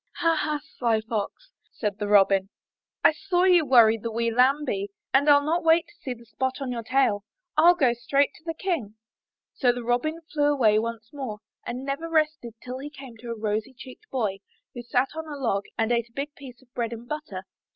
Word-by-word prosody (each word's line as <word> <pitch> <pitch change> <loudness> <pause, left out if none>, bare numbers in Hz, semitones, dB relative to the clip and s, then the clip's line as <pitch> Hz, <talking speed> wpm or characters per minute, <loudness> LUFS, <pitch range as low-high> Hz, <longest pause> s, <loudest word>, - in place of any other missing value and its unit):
"Ha! 330 -1 +2
Ha! 300 -1 -1 0.2
sly 230 -3 +2
Fox," 220 - -4 0.2
said 210 -2 -3
the 205 - -2
Robin, 195 -1 +4 0.5
*'I - - +7
saw 355 +3 0
you 360 -3 +6
worry 235 -5 +6
the 230 +2 -4
wee 230 +1 0
lambie, 250 -5 +2 0.2
and 275 +2 +4
Til 285 -1 +7
not 330 +4 0
wait 325 +1 +4
to - - -19
see 255 -2 -4
the 235 0 -16
spot 260 +5 -3
on 270 -2 -3
your 235 -1 -3
tail. 225 -4 +1 0.3
Til 340 +3 +6
go 260 -9 +3
straight 275 +4 +1
on - - -18
to - - -30
the 330 -1 -3
King." 315 - -2 0.6
So 250 -3 +3
the 245 0 -5
Robin 245 +7 0
flew 290 -1 +3
away 220 -7 +4
once 230 +1 -5
more, 260 -7 -5 0.3
and 250 +2 -4
never 280 +4 -3
rested 310 -7 0
till 255 +1 -6
he 285 +2 -6
came 270 -5 -11
to 235 +1 -10
a 230 - -4
rosy 215 +4 -2
cheeked 265 - -12
boy, 210 -7 -1 0.3
who 240 - -6
sat 250 +2 +1
on 320 0 -5
a 295 -2 -6
log 215 -7 -1
and 225 +1 +1
ate 235 0 +1
a - - -32
big 285 +3 -4
piece 260 -3 -12
of 250 -1 -30
bread 235 -1 -2
and 235 +1 -9
butter. 305 +2 -5
255 Hz, 215 wpm, -26 LUFS, 230-295 Hz, 0.6 s, I